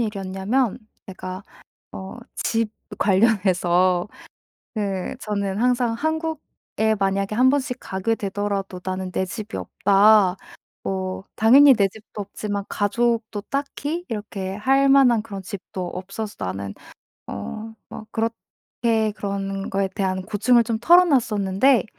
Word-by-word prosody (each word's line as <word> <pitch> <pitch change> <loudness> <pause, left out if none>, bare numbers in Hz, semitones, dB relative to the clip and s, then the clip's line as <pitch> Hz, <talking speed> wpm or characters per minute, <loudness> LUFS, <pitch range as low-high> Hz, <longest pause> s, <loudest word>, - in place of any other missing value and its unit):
일이었냐면 210 +3 -1 0.3
제가 185 0 -7 0.5
어 190 +5 -8 0.2
집 225 -1 0 0.3
관련해서 185 -3 +3 0.7
그 195 -3 -2
저는 200 -2 -2
항상 245 -1 +2
"한국에 315 -6 -2
만약에 195 +1 0
1 255 +3 +5
번씩 265 -2 0
가게 195 +4 -1
되더라도 195 -2 -3
나는 185 0 -3
내 190 - -1
집이 215 +3 -6
없다." 200 -1 +4 0.5
뭐 190 0 -3
당연히 270 +6 +7
내 200 -5 +3
집도 210 +1 -10
없지만 205 0 -4
가족도 220 +1 0
딱히 290 +4 -3
이렇게 205 -4 -4
할 270 +6 +3
만한 255 -5 +5
그런 200 -3 -7
집도 190 -1 -6
없어서 195 +4 -6
나는 95 +1 -4 0.5
어 100 - -6 0.3
막 215 - -8
그렇게 225 -1 -2
그런 195 -1 -3
거에 195 0 0
대한 190 -1 -2
고충을 220 +4 +3
좀 225 -1 -1
털어놨었는데 245 - +4
205 Hz, 245 characters per minute, -23 LUFS, 190-235 Hz, 0.7 s, 당연히